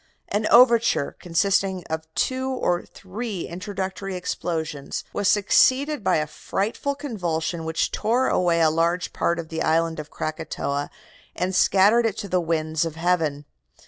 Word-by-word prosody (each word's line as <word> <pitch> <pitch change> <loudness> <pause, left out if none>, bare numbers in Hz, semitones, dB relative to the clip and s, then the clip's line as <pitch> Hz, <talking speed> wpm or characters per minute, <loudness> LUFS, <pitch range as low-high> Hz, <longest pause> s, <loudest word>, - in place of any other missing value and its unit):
An 210 +1 0
overture, 235 - +5
consisting 190 +1 +1
of 160 0 -5
two 260 0 0
or 180 -9 -1
three 200 0 -6
introductory 190 +1 -5
explosions, 160 -5 -3
was 205 - 0
succeeded 260 +7 +3
by - - +3
a 155 - +1
frightful 215 - -3
convulsion 175 - -3
which 160 0 -1
tore 245 +4 +1
away 170 -2 +2
a 160 -1 +4
large 170 +3 0
part 170 - 0
of 165 -1 -6
the 160 - -4
island 165 0 +1
of 150 -1 -7
Krakatoa 145 -2 -3 0.5
and 180 +2 -1
scattered 205 +5 +4
it 215 - -4
to 200 - -5
the 180 -1 +1
winds 160 -1 0
of 165 -2 -4
heaven. 165 -4 0
180 Hz, 145 wpm, -24 LUFS, 160-205 Hz, 0.5 s, overture